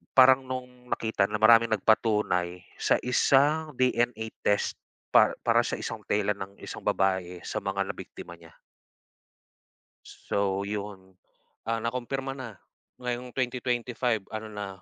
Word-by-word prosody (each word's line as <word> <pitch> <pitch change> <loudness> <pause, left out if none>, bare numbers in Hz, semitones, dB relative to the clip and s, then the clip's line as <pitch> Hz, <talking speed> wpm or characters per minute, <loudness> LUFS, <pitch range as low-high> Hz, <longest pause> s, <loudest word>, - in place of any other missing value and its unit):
parang 130 0 +8
nung 125 -1 -7
nakita 110 -3 +1
na 105 - -3
maraming 115 +1 +6
nagpatunay 100 -5 +1 0.2
sa - - +3
isang 145 +4 +3
DNA 120 -2 +1 0.2
test 105 - +1 0.4
pa - - +6
para - - +3
sa - - -3
isang - - -5
tela 105 0 +1
ng 95 0 -7
isang - - -7
babae 95 -2 0
sa - - -3
mga 100 0 -1
nabiktima 85 - -8
niya. 85 -1 -17 1.7
So, 100 -1 0
yun, 100 -2 -6 0.6
ah, 115 0 -1
nakumpirma 130 +3 -3
na 130 -6 -8 0.4
ngayong 125 0 -5
2025 125 -3 -1
ano 110 0 -5
na, 105 -1 -5
110 Hz, 125 wpm, -28 LUFS, 100-125 Hz, 1.7 s, parang